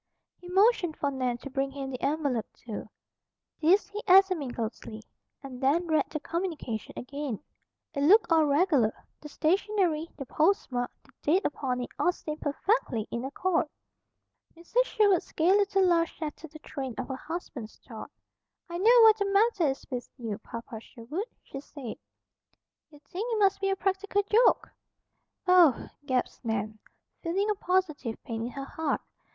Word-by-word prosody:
He 355 - -12
motioned 380 -4 +3
for 285 - 0
Nan 255 -3 -1
to 275 - -6
bring 270 0 0
him 270 -1 -6
the 255 - -6
envelope, 280 -7 0
too. 215 -2 -7 0.7
This 360 +6 +4
he 415 +1 -5
examined 370 -9 +5
closely, 220 -1 -5 0.4
and 260 -2 -8
then 295 +7 +2
read 315 -2 +1
the 305 - -3
communication 325 - -4
again. 275 -3 -4 0.5
It 280 - -2
looked 380 +7 +5
all 320 -2 +5
regular. 285 - +2
The 300 - -10
stationery, 340 0 +1
the 275 - -6
postmark, 285 -7 +1
the - - -23
date 360 +7 +2
upon 255 -3 -1
it, 245 - -5
all 355 - +3
seemed 305 -3 -7
perfectly 290 - 0
in 235 +1 -3
accord. 330 +5 0 0.9
Mrs. 455 +9 +1
Sherwood's 405 -6 +2
gay 330 +3 +3
little 400 -1 +3
laugh 335 -2 +3
shattered 310 0 -7
the 310 - -11
train 270 -5 -6
of - - -3
her 265 - -2
husband's 280 -7 -7
thought. - - -8 0.6
"I 345 - -3
know 470 +5 +7
what 440 -1 +7
the 405 - +1
matter 395 -3 +3
is 270 - -4
with 245 -1 -4
you, 225 -5 -4
Papa 230 0 -8
Sherwood," 260 - -6 0.2
she 275 - -8
said. 270 -4 -8 0.9
"You 300 - -16
think 420 +7 -4
it 450 - +1
must 395 -1 +3
be 390 - +1
a 390 - +2
practical 390 +1 0
joke." 440 +4 +4 0.8
"Oh!" 350 -8 +5 0.2
gasped 255 -1 -1
Nan, 215 -1 -2 0.4
feeling 390 +5 0
a - - +3
positive 350 - 0
pain 225 0 -4
at 245 - -8
her 275 0 -5
heart. 315 0 -2
310 Hz, 160 wpm, -28 LUFS, 260-380 Hz, 0.9 s, know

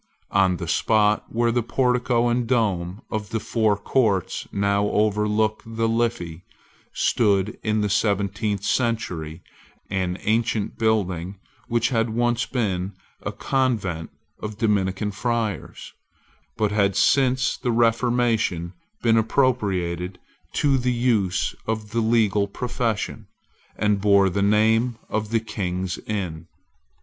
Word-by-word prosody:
On 95 -2 +3
the - - -5
spot 105 -1 +2
where 115 0 +1
the 120 +1 +1
portico 125 0 +1
and 120 0 0
dome 100 -4 0
of 105 -1 -3
the 115 - -1
Four 110 -2 +1
Courts 100 -3 0
now 100 0 +1
overlook 105 +1 +1
the 115 0 -2
Liffey, 115 -8 -1 0.5
stood, 105 -1 +1
in 110 -1 0
the 105 - +1
seventeenth 100 0 0
century, 90 -11 -1 0.5
an 95 -2 -1
ancient 110 -1 0
building 100 -4 0 0.3
which 120 0 +1
had 115 -2 +1
once 120 +1 0
been 100 -6 -1 0.3
a - - -3
convent 105 -12 -1 0.3
of 105 -1 -6
Dominican 105 -2 0
friars, 110 0 -3 0.6
but 105 -2 +1
had 100 -2 +2
since 130 +4 +3
the 125 - -1
Reformation 115 -6 +1 0.3
been 115 -1 +4
appropriated 100 -8 0 0.4
to 140 -2 +2
the 125 0 0
use 110 -7 +1
of 110 -1 -3
the 115 +1 +1
legal 110 -3 +2
profession, 115 0 -3 0.5
and 105 -2 +1
bore 100 -2 +4
the 100 - -1
name 110 +3 +3
of 110 -1 -2
the 115 0 +2
King's 95 -4 -3
Inns. 90 -6 -3
110 Hz, 120 wpm, -23 LUFS, 100-115 Hz, 0.6 s, been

